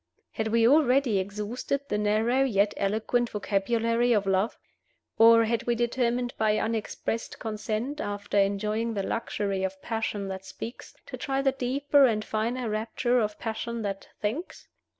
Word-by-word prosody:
Had 220 - -2
we 230 +1 +4
already 265 -6 +4
exhausted 210 +8 -3
the 210 - -1
narrow 220 +5 +2
yet 205 -5 +2
eloquent 220 +4 0
vocabulary 230 +4 +1
of 205 -2 +2
love? 195 +3 +1 0.6
Or 230 0 +7
had 230 +1 -1
we 240 - +2
determined 240 +1 0
by 215 -1 +3
unexpressed 225 +1 -3
consent, 220 +6 -3
after 205 -2 -1
enjoying 210 +3 0
the 200 - -1
luxury 200 -3 -2
of 190 0 -3
passion 220 -3 -2
that 190 0 -5
speaks, 225 +5 -9
to - - -7
try 270 -1 -1
the 270 - +4
deeper 275 +2 +3
and 215 -4 +1
finer 230 +3 -2
rapture 225 +3 0
of 210 -2 -1
passion 230 0 -4
that 195 -1 -4
thinks? 250 - -4
225 Hz, 150 wpm, -27 LUFS, 210-240 Hz, 0.6 s, Or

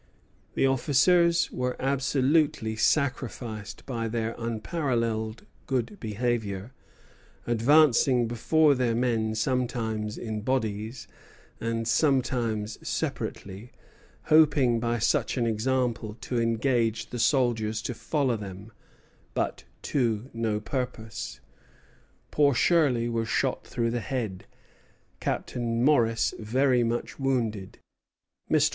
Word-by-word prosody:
"The - - +3
officers 165 +6 +3
were 125 0 -3
absolutely 135 -2 +1
sacrificed 115 -4 -1
by 115 -4 -3
their 115 0 -2
unparalleled 115 -2 -2 0.2
good 130 - -2
behavior; 110 -1 -2 0.7
advancing 125 0 +4
before 145 +6 +3
their 125 -3 0
men 115 -3 0
sometimes 110 -2 -1
in 110 -2 -4
bodies, 110 -1 -2 0.5
and 115 0 -2
sometimes 120 -6 +1
separately, 100 +5 -4 0.5
hoping 145 -6 +4
by 120 +1 0
such 115 - +1
an 120 - +1
example 115 -1 -1
to 120 -2 -1
engage 115 0 0
the 120 - -4
soldiers 115 -4 +1
to 125 - -3
follow 135 +1 0
them; 100 0 -8 0.6
but - - -2 0.2
to 120 -2 -1
no 115 -2 -1
purpose. 110 - -5 0.9
Poor 145 -3 +3
Shirley 130 -5 +3
was 115 -1 -1
shot - - 0
through 115 -1 -1
the 120 - -1
head, 110 -6 -4 0.7
Captain 115 -1 -2
Morris 115 -6 +3
very 125 +3 +2
much 120 +4 -3
wounded. 115 -8 -1 0.7
Mr. - - +4
120 Hz, 100 wpm, -27 LUFS, 110-130 Hz, 0.9 s, advancing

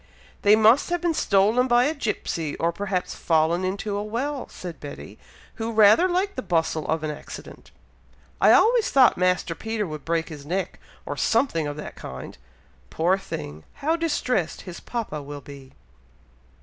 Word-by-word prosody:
"They 205 +1 +6
must 220 +8 +5
have 350 0 0
been 345 -1 0
stolen 215 +1 +3
by 240 0 +4
a 295 +5 +1
gipsey, 165 - -3
or 170 +1 +1
perhaps 190 0 -3
fallen 165 +2 +1
into 200 +2 -2
a 205 - -2
well," 255 +6 -3
said 175 -3 -8
Betty, 145 -1 -9 0.4
who 225 -1 -3
rather 220 - +6
liked 375 +3 0
the - - -3
bustle 160 -6 -1
of 160 0 -1
an 155 - -1
accident. 150 - -10 0.7
"I - - +7
always 465 -1 +5
thought 265 -2 +5
Master 180 -1 +1
Peter 220 +3 -3
would 155 -4 -7
break 165 0 -1
his 150 -3 -9
neck, 180 +4 -3 0.3
or - - -5
something 165 - +1
of 145 0 -5
that 150 - -7
kind. 65 0 -8 0.5
Poor 175 +4 +2
thing! 75 - -7
how 315 +4 0
distressed 255 - -1
his 180 -2 -9
papa 220 -11 -4
will 145 0 -8
be!" 140 -2 -12
195 Hz, 165 wpm, -24 LUFS, 160-245 Hz, 0.7 s, I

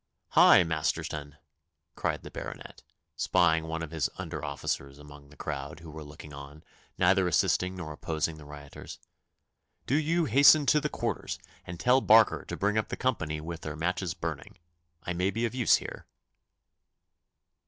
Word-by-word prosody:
'Hi, 95 - +7
Masterton!' 75 -2 -3 0.6
cried - - -2
the - - -10
Baronet, - - -8 0.3
spying 80 -3 +2
one 80 0 -3
of 80 - -7
his 80 -3 -1
under - - -6
officers 70 -1 -4
among 75 -1 -14
the 75 - -17
crowd 70 +1 -5
who 80 -2 -10
were 80 0 -8
looking 75 0 -12
on, 70 +2 -11 0.3
neither 95 0 +3
assisting 90 +2 +1
nor 85 -4 -6
opposing 80 +1 -3
the 75 - -12
rioters. 75 -1 -10 0.9
'Do - - -2
you 160 +3 +2
hasten 140 +4 +6
to 150 +1 +4
the 150 - -1
quarters, - - -3 0.3
and 85 0 -7
tell 125 +5 +4
Barker 110 -2 +5
to - - -5
bring 105 +2 +1
up 110 - -2
the - - -5
company 80 -12 -1
with 85 +1 -7
their 75 -1 -5
matches 90 +2 -2
burning. 80 -4 -6 0.5
I 90 - -3
may 90 +2 0
be 115 +4 -1
of 115 - -3
use 125 -3 +4
here. - - -6
80 Hz, 165 wpm, -29 LUFS, 75-100 Hz, 0.9 s, Hi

